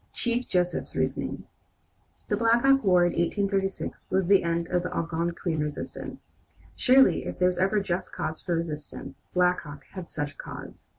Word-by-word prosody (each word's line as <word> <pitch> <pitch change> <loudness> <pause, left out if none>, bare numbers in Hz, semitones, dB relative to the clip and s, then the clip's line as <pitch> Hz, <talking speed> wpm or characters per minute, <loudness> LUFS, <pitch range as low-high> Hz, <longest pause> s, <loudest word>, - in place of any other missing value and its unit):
CHIEF 240 +1 0
JOSEPH'S 180 -1 0
REASONING - - -1 0.8
The 205 - +1
Black 230 +2 +3
Hawk 270 -1 +5
war 180 -3 +5
in 175 - +2
1836 195 +2 -1
was 190 -1 +2
the 195 +2 +5
end 170 0 -1
of 180 0 +1
the 180 - -4
Algonquin 170 0 -2
resistance. 150 -1 -6 0.3
Surely 265 +1 +5
if - - -5
there 180 - +4
was 180 -1 0
ever 195 +3 +3
just 185 -2 -2
cause 155 - -4
for 175 - -1
resistance, 150 -4 -5
Black 180 0 +4
Hawk 145 -2 -10
had 185 -3 -7
such 145 -1 -3
a - - -34
cause. - - -9
180 Hz, 170 wpm, -27 LUFS, 170-195 Hz, 0.8 s, Hawk